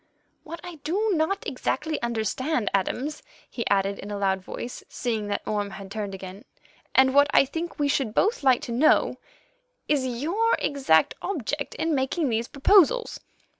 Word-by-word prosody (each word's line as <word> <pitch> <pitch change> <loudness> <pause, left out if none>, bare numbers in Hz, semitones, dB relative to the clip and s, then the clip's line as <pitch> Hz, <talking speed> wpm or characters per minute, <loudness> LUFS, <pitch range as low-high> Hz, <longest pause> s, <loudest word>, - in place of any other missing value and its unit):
"What 335 +2 -8
I 355 -2 -8
do 380 +9 -1
not 340 +4 0
exactly 315 -2 -2
understand, 235 +3 -1
Adams," 255 +10 -1 0.3
he 235 - -4
added 195 0 +1
in 200 - -8
a 205 - -4
loud 190 -1 0
voice, 240 +6 -7
seeing 220 -4 -2
that 205 - -2
Orme 205 -1 -1
had 195 0 -10
turned 205 -2 -4
again, 190 +2 -9 0.5
"and 265 0 +5
what 285 +1 +6
I - - +7
think 330 +5 -5
we 290 -2 +1
should 270 -6 0
both 445 +4 +2
like 260 -3 +4
to - - -6
know, 260 +7 +3 0.7
is 275 -3 +1
your 335 - +1
exact 265 - +2
object 290 - -3
in 325 0 -1
making 275 +2 0
these 230 +1 -1
proposals." 400 - +3
265 Hz, 165 wpm, -25 LUFS, 210-315 Hz, 0.7 s, I